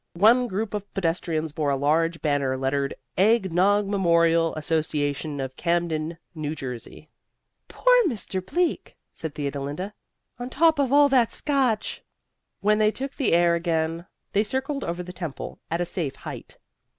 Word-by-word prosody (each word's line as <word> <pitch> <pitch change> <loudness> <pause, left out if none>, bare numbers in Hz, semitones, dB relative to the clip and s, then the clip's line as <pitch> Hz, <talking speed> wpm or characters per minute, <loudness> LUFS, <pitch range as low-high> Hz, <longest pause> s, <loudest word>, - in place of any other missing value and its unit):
One 235 +7 +5
group 210 +1 -3
of 205 -1 -5
pedestrians 165 -3 -1
bore 150 -1 -1
a 140 - +2
large 165 +4 +1
banner 140 -3 +1
lettered 135 +1 -1 0.2
EGG 195 -3 +3
NOG 200 +4 +3
MEMORIAL 170 -4 +3
ASSOCIATION 150 -2 -1
OF 130 -1 -4
CAMDEN, 170 -2 -1 0.2
N. 155 0 -3
J. 125 +2 -8 0.6
"Poor - - +3
Mr. 200 - -3
Bleak!" 345 - -1 0.2
said 160 -3 -6
Theodolinda. 145 +7 -4 0.5
"On 245 +1 -4
top 315 +3 +3
of 270 -3 +2
all 290 0 +7
that 250 -4 +3
Scotch!" 265 -7 0 0.6
When 210 +1 +3
they 215 0 +5
took 270 +5 -5
the 265 - +1
air 170 0 +4
again 165 0 -1 0.3
they 200 - +4
circled 265 +5 -2
over 175 +1 -3
the 180 0 -9
temple 170 -6 -6
at 170 +2 -1
a - - +1
safe 160 -6 -3
height. - - -9
170 Hz, 150 wpm, -25 LUFS, 155-215 Hz, 0.6 s, all